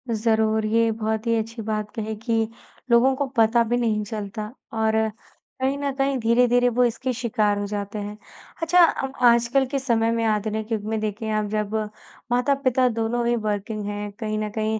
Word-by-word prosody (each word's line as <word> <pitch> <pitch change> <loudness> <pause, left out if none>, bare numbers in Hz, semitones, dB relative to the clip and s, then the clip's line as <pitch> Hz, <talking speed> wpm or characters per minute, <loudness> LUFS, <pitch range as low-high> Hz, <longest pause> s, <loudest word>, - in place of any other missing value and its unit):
ज़रूर। 220 0 +1
ये 230 +1 +2
बहुत 220 0 -2
ही 230 - +3
अच्छी 225 +1 -4
बात 215 -1 -3
कही 220 -1 -3
कि 225 0 0 0.4
लोगों 240 +3 +5
को 285 +1 -1
पता 225 +1 +4
भी 235 +2 0
नहीं 220 -3 0
चलता, 210 +1 -5 0.2
और 220 0 +1 0.7
कहीं 270 +2 +1
न 280 0 -1
कहीं 275 0 +1
धीरे-धीरे 245 +1 +3
वो 245 +1 +2
इसके 255 +2 -1
शिकार 215 -4 0
हो 205 - -2
जाते 205 0 -4
हैं। 205 +1 -6 0.4
अच्छा, 330 +2 +3 0.2
हम 270 0 -2 0.2
आजकल 235 +3 +4
के 275 +1 -2
समय 230 -3 +1
में 230 0 0
आधुनिक 215 +1 -1
युग 215 -2 -1
में 220 -1 -1
देखें 215 +1 -3
अब 215 -1 0
जब 210 0 -2 0.6
माता-पिता 255 0 +2
दोनों 230 +1 -1
ही 240 - +2
वर्किंग 210 -1 -3
हैं, 205 0 -4
कहीं 215 -2 -2
न 215 0 -2
कहीं 220 0 0
225 Hz, 185 wpm, -24 LUFS, 215-240 Hz, 0.7 s, लोगों